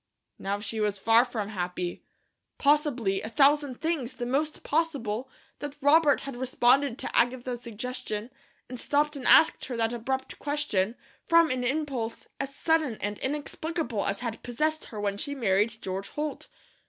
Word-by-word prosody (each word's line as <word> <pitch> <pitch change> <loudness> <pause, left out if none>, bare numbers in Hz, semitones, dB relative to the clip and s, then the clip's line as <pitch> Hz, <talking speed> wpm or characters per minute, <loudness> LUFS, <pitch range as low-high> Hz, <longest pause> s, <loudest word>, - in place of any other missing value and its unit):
Now 200 +1 -2
she 220 +1 -4
was 210 -1 +1
far 225 +4 +5
from 215 -5 -4
happy. 180 -3 -3 0.6
Possibly 280 -9 +2
a 220 - -5
thousand 280 0 +3
things, 300 -7 -2
the 245 - -4
most 290 +5 -1
possible, 265 -7 -1 0.3
that 290 0 -6
Robert 290 0 +5
had 275 -2 -6
responded 255 +1 +3
to - - -5
Agatha's 245 0 +1
suggestion, 235 -1 -4 0.4
and 250 -1 -6
stopped 295 +3 +1
and 270 - -4
asked 320 - +6
her 250 -2 -4
that 225 0 +1
abrupt 260 +3 -3
question, 245 -8 0 0.3
from 335 -2 +5
an 255 -1 -1
impulse 260 -4 -2
as 275 0 -4
sudden 315 -8 +1
and 205 0 -3
inexplicable 295 -3 -2
as 200 +2 -2
had 230 -3 -4
possessed 305 +6 -1
her 215 - -8
when 200 -1 -1
she 285 +5 -2
married 215 -2 +1
George 190 +1 -3
Holt. 300 0 -4
250 Hz, 155 wpm, -28 LUFS, 220-290 Hz, 0.6 s, asked